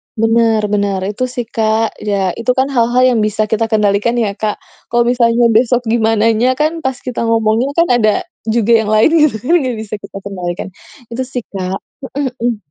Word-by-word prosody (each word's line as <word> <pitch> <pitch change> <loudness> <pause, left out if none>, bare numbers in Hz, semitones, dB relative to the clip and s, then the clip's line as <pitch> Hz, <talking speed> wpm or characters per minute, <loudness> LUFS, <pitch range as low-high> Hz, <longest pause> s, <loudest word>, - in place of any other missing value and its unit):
Bener 225 -1 +2
bener. 200 -2 0
Itu 255 +5 -2
sih, 245 -1 -4
Kak. 220 0 -1
Ya, 195 -3 -1
itu 230 +2 +1
kan 265 +1 +2
hal-hal 240 +1 +3
yang 235 - +1
bisa 215 0 0
kita 225 0 +1
kendalikan 210 +1 +1
ya, 220 -4 +1
Kak. 215 -1 -1 0.3
Kalau 240 0 +2
misalnya 235 -1 +2
besok 240 +2 +2
gimananya 225 +2 +2
kan, 310 +4 -1
pas 265 -1 0
kita 250 -2 -3
ngomongnya, 225 +3 +1
kan 335 +1 +4
ada 215 -2 +2 0.2
juga 225 0 +1
yang - - -3
lain 215 +7 +5 0.2
gitu, 270 - -5
kan 305 - +1
gak 250 -3 -2
bisa 215 -1 -5
kita 195 - -10
kendalikan. 180 -2 -5 0.4
Itu 250 +3 -2
sih, 250 -3 -5
Kak. 190 -1 -3 0.4
Heeh 285 - -1 0.2
heeh. 235 -1 0
225 Hz, 185 wpm, -15 LUFS, 215-245 Hz, 0.4 s, lain